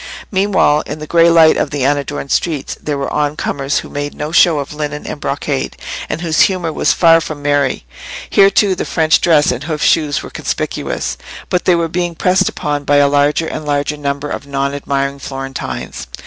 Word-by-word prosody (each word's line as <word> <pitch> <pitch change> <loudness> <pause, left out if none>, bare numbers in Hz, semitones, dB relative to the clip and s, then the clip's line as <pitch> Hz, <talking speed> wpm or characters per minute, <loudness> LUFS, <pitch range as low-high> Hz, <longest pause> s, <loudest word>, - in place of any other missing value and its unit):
Meanwhile 190 -6 +2
in 150 - -5
the 155 - -7
grey 170 +2 +4
light 165 -1 +6
of - - 0
the 140 -3 -2
unadorned 145 0 -1
streets 155 -6 -1
there 150 -2 -2
were 140 - -3
on 150 0 0
comers 140 0 -1
who - - -10
made 145 0 -4
no 150 +1 -4
show 170 -1 +5
of 140 0 -4
linen 150 -1 -4
and 145 - -6
brocade, 140 -1 -3 0.3
and 160 - -3
whose 160 -2 +1
humour 175 -4 -3
was - - +2
far 165 -1 +5
from 150 -3 -6
merry. 145 - 0 0.4
Here, 195 0 +5
too, 200 0 +2
the 180 - -3
French 155 +2 +2
dress 155 -5 +4
and 125 +3 -4
hoofed 155 -2 -2
shoes 150 -3 +2
were - - -9
conspicuous, - - -3 0.3
but 180 - 0
they 180 - +4
were 170 -1 0
being 175 +1 -2
pressed 185 +3 +2
upon 145 -1 -3
by 145 0 +2
a 145 0 +5
larger 145 +3 +2
and 155 - -5
larger 145 0 -1
number 145 0 -3
of 140 - -5
non 140 0 -1
admiring 140 0 -2
Florentines. 135 -1 -6
150 Hz, 200 wpm, -16 LUFS, 140-165 Hz, 0.4 s, light